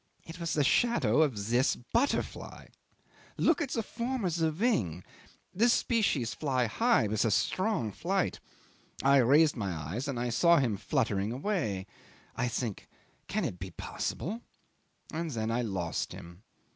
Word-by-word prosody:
It 165 Hz, +2 st, -9 dB
was 170 Hz, -1 st, -2 dB
the 150 Hz, -, +3 dB
shadow 150 Hz, -, +3 dB
of 115 Hz, -9 st, 0 dB
this 125 Hz, +3 st, +3 dB
butterfly. 235 Hz, -, -2 dB, 0.7 s
Look 330 Hz, 0 st, +3 dB
at 290 Hz, -, -1 dB
the 230 Hz, -, -1 dB
form 235 Hz, 0 st, -3 dB
of 170 Hz, -3 st, 0 dB
the 165 Hz, -2 st, +1 dB
wing. 140 Hz, -, 0 dB, 0.5 s
This 235 Hz, +5 st, +4 dB
species 200 Hz, -, +1 dB
fly 130 Hz, -5 st, 0 dB
high 230 Hz, -, +2 dB
with 105 Hz, 0 st, +1 dB
a 115 Hz, -, +2 dB
strong 160 Hz, -, 0 dB
flight. 185 Hz, -, -1 dB, 0.6 s
I 140 Hz, +1 st, +6 dB
raised 145 Hz, +5 st, +5 dB
my 100 Hz, -6 st, -2 dB
eyes 85 Hz, -, -4 dB
and 135 Hz, -4 st, -2 dB
I 120 Hz, 0 st, -1 dB
saw 170 Hz, +8 st, +5 dB
him 125 Hz, -7 st, +1 dB
fluttering 100 Hz, +1 st, 0 dB
away. 125 Hz, -, -2 dB, 0.5 s
I 125 Hz, -, 0 dB
think 115 Hz, -3 st, -4 dB, 0.4 s
Can -, -, -1 dB
it 90 Hz, -, -4 dB
be 95 Hz, +1 st, -6 dB
possible? 215 Hz, -, -4 dB, 0.7 s
And 165 Hz, +1 st, -2 dB
then 115 Hz, -5 st, -2 dB
I 120 Hz, +2 st, +1 dB
lost 95 Hz, -7 st, -2 dB
him. 85 Hz, +2 st, -11 dB
135 Hz, 155 wpm, -30 LUFS, 110-185 Hz, 0.7 s, I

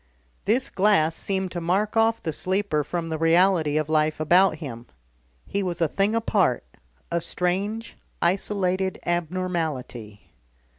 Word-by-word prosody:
This 240 Hz, +6 st, +1 dB
glass 185 Hz, -5 st, +3 dB
seemed 190 Hz, -1 st, -2 dB
to 175 Hz, -, -4 dB
mark 195 Hz, +6 st, 0 dB
off 225 Hz, 0 st, +2 dB
the 160 Hz, -, -2 dB
sleeper 185 Hz, -5 st, 0 dB
from 170 Hz, +2 st, -4 dB
the 160 Hz, -1 st, -3 dB
reality 165 Hz, -2 st, +3 dB
of 155 Hz, -1 st, 0 dB
life 155 Hz, 0 st, +1 dB
about 175 Hz, +3 st, +4 dB
him, 125 Hz, -7 st, -8 dB, 0.6 s
he 200 Hz, -, -2 dB
was 180 Hz, -3 st, -3 dB
a 165 Hz, -, +3 dB
thing 200 Hz, +7 st, 0 dB
apart, 200 Hz, -, +1 dB, 0.5 s
a 170 Hz, 0 st, 0 dB
strange, 200 Hz, +7 st, -2 dB, 0.2 s
isolated 190 Hz, 0 st, 0 dB
abnormality. 160 Hz, -, -3 dB
180 Hz, 135 wpm, -24 LUFS, 155-195 Hz, 0.6 s, about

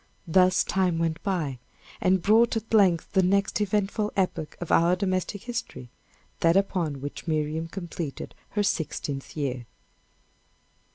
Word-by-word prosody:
Thus 185 Hz, +2 st, +4 dB
time 185 Hz, -3 st, +1 dB
went 165 Hz, -1 st, -1 dB
by, 160 Hz, -, -2 dB, 0.4 s
and 185 Hz, -1 st, +2 dB
brought 225 Hz, +3 st, +4 dB
at 225 Hz, +1 st, -6 dB
length 185 Hz, -6 st, +4 dB
the 190 Hz, -, +5 dB
next 200 Hz, +3 st, +1 dB
eventful 210 Hz, +1 st, 0 dB
epoch 170 Hz, -5 st, -1 dB
of 175 Hz, -, -5 dB
our 170 Hz, +2 st, +4 dB
domestic 185 Hz, +1 st, -2 dB
history 235 Hz, -, -5 dB, 0.5 s
that 165 Hz, +2 st, +4 dB
upon 170 Hz, -8 st, 0 dB
which 145 Hz, +4 st, -7 dB
Miriam 155 Hz, +1 st, -1 dB
completed 170 Hz, -4 st, -6 dB, 0.2 s
her 205 Hz, -, +3 dB
sixteenth 145 Hz, -6 st, -3 dB
year. 130 Hz, -5 st, -3 dB
180 Hz, 130 wpm, -26 LUFS, 160-195 Hz, 0.5 s, the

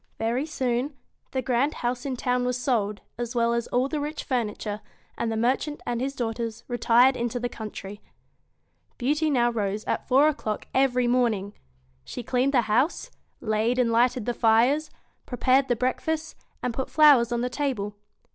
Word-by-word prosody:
Very 240 Hz, +6 st, -1 dB
soon, 260 Hz, -1 st, -1 dB, 0.3 s
the 260 Hz, -1 st, -2 dB
grand 260 Hz, +5 st, +1 dB
house 245 Hz, +2 st, -2 dB
in 265 Hz, -, -2 dB
town 250 Hz, 0 st, 0 dB
was 250 Hz, 0 st, 0 dB
sold, 215 Hz, -5 st, -1 dB, 0.2 s
as 240 Hz, 0 st, -4 dB
well 235 Hz, 0 st, +2 dB
as 235 Hz, 0 st, -1 dB
all 250 Hz, +2 st, +1 dB
the 300 Hz, +1 st, -2 dB
rich 300 Hz, +1 st, -4 dB
furniture, 215 Hz, -4 st, -2 dB, 0.3 s
and 230 Hz, -1 st, -2 dB
the 220 Hz, -, -2 dB
merchant 260 Hz, +6 st, 0 dB
and 240 Hz, 0 st, -2 dB
his 275 Hz, +1 st, -2 dB
daughters 230 Hz, -1 st, -3 dB
retired 245 Hz, +1 st, +4 dB
into 240 Hz, 0 st, -2 dB
the 245 Hz, -, -1 dB
country. 210 Hz, -3 st, -8 dB, 1.0 s
Beauty 300 Hz, +5 st, +1 dB
now 240 Hz, -4 st, +2 dB
rose 210 Hz, -2 st, -2 dB
at -, -, -2 dB
four 270 Hz, +4 st, +5 dB
o'clock 225 Hz, -8 st, -2 dB
every 255 Hz, -2 st, +2 dB
morning. 230 Hz, -5 st, +1 dB, 0.5 s
She 245 Hz, -, -7 dB
cleaned 255 Hz, +4 st, +1 dB
the 245 Hz, -, +5 dB
house, 240 Hz, +9 st, 0 dB, 0.3 s
laid 220 Hz, +3 st, 0 dB
and 245 Hz, -2 st, +2 dB
lighted 240 Hz, 0 st, +2 dB
the 245 Hz, -, 0 dB
fires, 240 Hz, +8 st, +3 dB, 0.4 s
prepared 260 Hz, +2 st, +2 dB
the 245 Hz, -, +2 dB
breakfast, 310 Hz, +6 st, -2 dB, 0.3 s
and 250 Hz, -, -1 dB
put 265 Hz, +2 st, -3 dB
flowers 280 Hz, -7 st, +6 dB
on 240 Hz, 0 st, 0 dB
the 250 Hz, -, 0 dB
table. 245 Hz, -8 st, -2 dB
245 Hz, 170 wpm, -26 LUFS, 230-265 Hz, 1.0 s, flowers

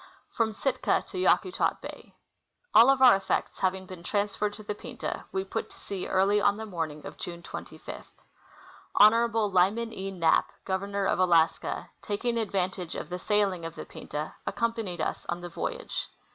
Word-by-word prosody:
From 225 Hz, -1 st, +1 dB
Sitka 260 Hz, +5 st, 0 dB
to -, -, -4 dB
Yakutat 370 Hz, 0 st, +2 dB
Bay. -, -, -10 dB, 0.6 s
All 235 Hz, +4 st, +8 dB
of 270 Hz, -1 st, +4 dB
our 250 Hz, -5 st, +9 dB
effects 195 Hz, -, -1 dB
having 190 Hz, 0 st, 0 dB
been 185 Hz, -2 st, -9 dB
transferred 205 Hz, +2 st, -1 dB
to 215 Hz, +1 st, -10 dB
the 210 Hz, -, -3 dB
Pinta, -, -, -6 dB
we 190 Hz, 0 st, -1 dB
put 195 Hz, -, -4 dB
to -, -, -14 dB
sea 195 Hz, -2 st, -5 dB
early 195 Hz, +2 st, +3 dB
on 200 Hz, 0 st, +3 dB
the 220 Hz, -, -5 dB
morning 160 Hz, -6 st, -4 dB
of -, -, -8 dB
June 170 Hz, -1 st, -6 dB
25. -, -, -8 dB, 0.9 s
Honorable 225 Hz, -1 st, +5 dB
Lyman 205 Hz, +6 st, +2 dB
E. 195 Hz, +1 st, -4 dB
Knapp, 170 Hz, -4 st, +2 dB
Governor 200 Hz, +1 st, -1 dB
of 190 Hz, -, +1 dB
Alaska, 170 Hz, -3 st, +2 dB
taking 230 Hz, +3 st, -1 dB
advantage 190 Hz, -4 st, -2 dB
of -, -, -5 dB
the 180 Hz, 0 st, -4 dB
sailing, 200 Hz, -3 st, +1 dB
of 165 Hz, 0 st, -6 dB
the -, -, -7 dB
Pinta, 150 Hz, +1 st, -6 dB
accompanied 225 Hz, -7 st, -1 dB
us -, -, -2 dB
on 175 Hz, 0 st, -2 dB
the 175 Hz, -, -6 dB
voyage. 170 Hz, -, -4 dB
195 Hz, 170 wpm, -28 LUFS, 180-215 Hz, 0.9 s, our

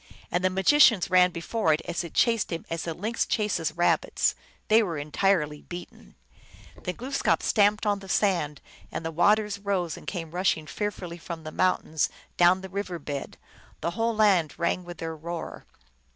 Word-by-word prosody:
And 180 Hz, -, 0 dB
the 185 Hz, -, +4 dB
magicians 195 Hz, 0 st, +4 dB
ran 180 Hz, -1 st, +6 dB
before 170 Hz, +1 st, 0 dB
it 150 Hz, -, -1 dB
as 175 Hz, -, -3 dB
it 170 Hz, -, -9 dB
chased 230 Hz, -3 st, +2 dB
them 165 Hz, -1 st, -4 dB
as 165 Hz, 0 st, -3 dB
a 165 Hz, -, -1 dB
lynx 220 Hz, +7 st, -1 dB
chases 210 Hz, -8 st, 0 dB
rabbits; 175 Hz, +1 st, +2 dB, 0.3 s
they 220 Hz, +1 st, +6 dB
were 175 Hz, -7 st, -2 dB
entirely 150 Hz, 0 st, 0 dB
beaten. 175 Hz, -, -10 dB, 0.7 s
Then 180 Hz, -, -4 dB
Glooskap 260 Hz, +4 st, 0 dB
stamped 210 Hz, 0 st, +3 dB
on 205 Hz, -1 st, +1 dB
the 195 Hz, -1 st, -12 dB
sand, 175 Hz, -9 st, +1 dB, 0.3 s
and 165 Hz, -, -5 dB
the 165 Hz, -, -2 dB
waters 210 Hz, +4 st, +2 dB
rose 190 Hz, -5 st, -1 dB
and -, -, -13 dB
came 165 Hz, -5 st, -4 dB
rushing 175 Hz, -3 st, 0 dB
fearfully 180 Hz, -2 st, -4 dB
from 165 Hz, -1 st, -7 dB
the 155 Hz, -, -6 dB
mountains 160 Hz, -3 st, +1 dB, 0.3 s
adown 180 Hz, +2 st, +5 dB
the 190 Hz, -, -8 dB
river 190 Hz, -2 st, -4 dB
bed; 145 Hz, -2 st, -6 dB, 0.4 s
the 170 Hz, -, -1 dB
whole 225 Hz, +5 st, 0 dB
land 195 Hz, -8 st, +3 dB
rang 170 Hz, +1 st, 0 dB
with 175 Hz, -1 st, -8 dB
their 165 Hz, 0 st, -5 dB
roar. 170 Hz, +2 st, -7 dB
180 Hz, 175 wpm, -27 LUFS, 165-205 Hz, 0.7 s, ran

